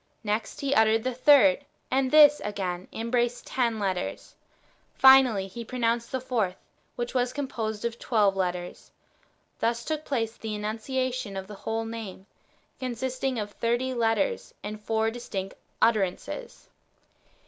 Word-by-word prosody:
Next 215 +1 -2
He 280 -1 0
uttered 220 -2 +4
the 255 0 -1
third, 280 +2 +6 0.3
and 265 0 +2
this 295 0 +7
again 185 -3 -3
embraced 240 +1 -1
ten 235 -3 0
letters. 190 -3 -3 0.6
Finally, 265 -7 +6
He 195 +5 -7
pronounced 235 -1 -1
the 260 - -1
fourth, 230 -8 -1 0.4
which 240 0 -4
was 250 -1 +1
composed 230 -6 -3
of 235 0 -3
tw^elve 210 -4 +2
letters. 180 -2 -3 0.7
Thus 230 +1 0
took 310 -1 -2
place 230 -6 -2
the 220 -1 -4
enunciation 230 +1 -3
of 190 - -5
the 210 - -10
whole 225 +3 -3
name, 220 -4 -7 0.5
consisting 255 +1 -2
of 210 -1 -3
thirty 240 +4 -1
letters, 225 -4 0
and 215 +1 -6
four 220 +1 0
distinct 200 -5 -5 0.3
utter 225 -2 +5
ances. 185 -1 -5
230 Hz, 135 wpm, -27 LUFS, 210-255 Hz, 0.7 s, this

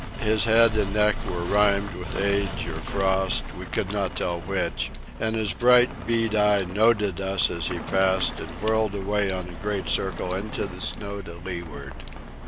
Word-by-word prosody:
His 110 0 +2
head 115 0 +5
and 100 -1 0
neck 105 0 +4
were 90 -1 -3
rimed 100 +1 +2
with 90 +2 -6
age 100 0 0
or - - -6
frost—we 95 -1 0
could - - -2
not - - -2
tell 85 -1 -2
which—and 110 +6 -3
his 110 -2 -1
bright 125 0 +4
bead 115 -1 +2
eye 105 -2 +3
noted 105 0 +1
us 95 0 +2
as 85 -2 -2
he - - -2
passed 95 -1 +1
and 80 - -7
whirled 110 -1 +1
away 100 0 0
on 90 -1 -4
a 85 -2 -11
great 105 -2 -2
circle 90 -1 -1
into 100 +2 -3
the 90 -2 -8
snow 100 0 -3
to 85 -2 -10
leeward. 80 -7 -7
100 Hz, 170 wpm, -25 LUFS, 95-105 Hz, -, head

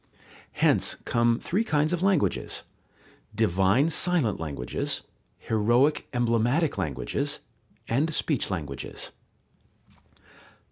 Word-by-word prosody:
Hence - - +2
come 115 0 +2
three 195 - -1
kinds 155 -4 +1
of 175 - -1
languages: 190 -4 +1 0.7
divine 105 - +3
silent 165 - +2
languages, 70 -6 -3 0.3
heroic 120 +7 +2
emblematic 120 +6 +1
languages, 70 -4 -2 0.5
and 145 +8 +1
speech 150 -3 +1
languages. 75 -8 -5
120 Hz, 85 wpm, -27 LUFS, 100-155 Hz, 0.7 s, divine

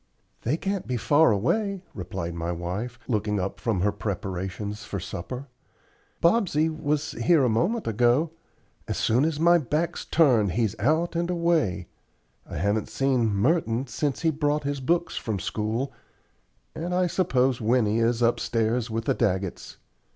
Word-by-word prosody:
"They 135 +7 0
can't 195 +1 -3
be 125 -1 -1
far 145 +5 +4
away," 195 - 0
replied 85 -2 -5
my 85 +1 -3
wife, 90 +8 -4
looking 105 -3 0
up 95 +1 -3
from 110 -6 0
her 105 +2 +2
preparations 100 +1 -4
for 100 - -4
supper. 125 +11 -6 0.8
"Bobsey 170 -5 +3
was 150 -1 -1
here 165 -5 +3
a 125 - +3
moment 180 - +1
ago. 120 +8 +2 0.6
As - - -2
soon 120 +5 +2
as 160 -2 -1
my 170 +1 +5
back's 155 +4 -1
turned 120 - +3
he's 110 -1 0
out 160 - +1
and 170 +1 0
away. 165 - +1 0.6
I - - -5
haven't 100 +6 0
seen 130 -5 +1
Merton 115 - +1
since 135 +3 -2
he 160 - +3
brought 150 0 0
his 140 0 -2
books 170 +6 0
from 110 -3 -2
school, 110 +7 -2 0.8
and 175 +2 -3
I 180 0 +3
suppose 135 -9 +1
Winnie 110 -1 +2
is 115 +1 +2
upstairs 115 0 +1
with 115 0 -3
the - - +2
Daggetts." 95 -5 -2
125 Hz, 150 wpm, -26 LUFS, 105-160 Hz, 0.8 s, my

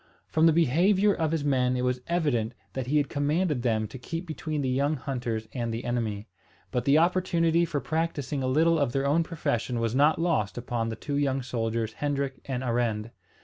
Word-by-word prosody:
From 160 +1 +3
the - - +6
behaviour 180 +7 +3
of 160 -4 -1
his 160 -3 0
men 130 -2 +2
it 125 - -1
was 125 0 0
evident 135 -10 0 0.2
that 130 -2 -3
he 150 +3 +2
had 145 -1 +2
commanded 150 0 0
them 110 -3 0
to 130 - -9
keep 165 +7 -5
between 155 -2 -3
the 130 - 0
young 140 +4 +1
hunters 120 -5 -3
and 120 -2 -2
the 115 +1 -4
enemy. 115 -3 -2 0.4
But 125 - -1
the 140 +2 +5
opportunity 170 -1 +2
for 155 -3 -2
practising 155 -3 -2
a 130 - -1
little 160 +5 +3
of 140 -4 0
their 135 0 0
own 150 +4 +3
profession 125 -8 -2
was 115 -1 0
not 145 +4 +4
lost 160 - 0
upon 120 -2 -2
the 110 - -3
two 140 +5 -3
young 135 -2 0
soldiers 115 -2 -2
Hendrik 140 -1 -2
and 130 -2 -3
Arend. 115 -2 -1
135 Hz, 200 wpm, -27 LUFS, 120-160 Hz, 0.4 s, the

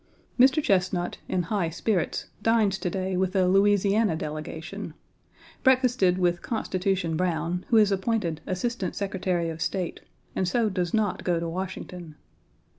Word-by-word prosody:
Mr. 270 +4 +5
Chesnut, 180 -4 +1
in 180 - 0
high 175 -1 -1
spirits, 175 +2 -1 0.2
dines 215 -3 +2
to 180 - -1
day 185 +1 -2
with 185 0 0
the 190 -2 +3
Louisiana 200 0 +3
delegation. 155 +1 -6 0.7
Breakfasted 250 -8 +3
with 175 -1 +1
"Constitution" 190 -6 -1
Browne, 175 0 -1
who 230 - +5
is 210 -2 +5
appointed 190 -5 -1
Assistant 190 0 -2
Secretary 185 -4 -1
of 160 0 -8
State, 185 -1 -2 0.4
and 185 - 0
so 225 +4 +2
does 180 -3 -1
not 215 -3 0
go 175 -2 +1
to 170 - -3
Washington. 180 -2 -6
185 Hz, 140 wpm, -26 LUFS, 175-205 Hz, 0.7 s, Mr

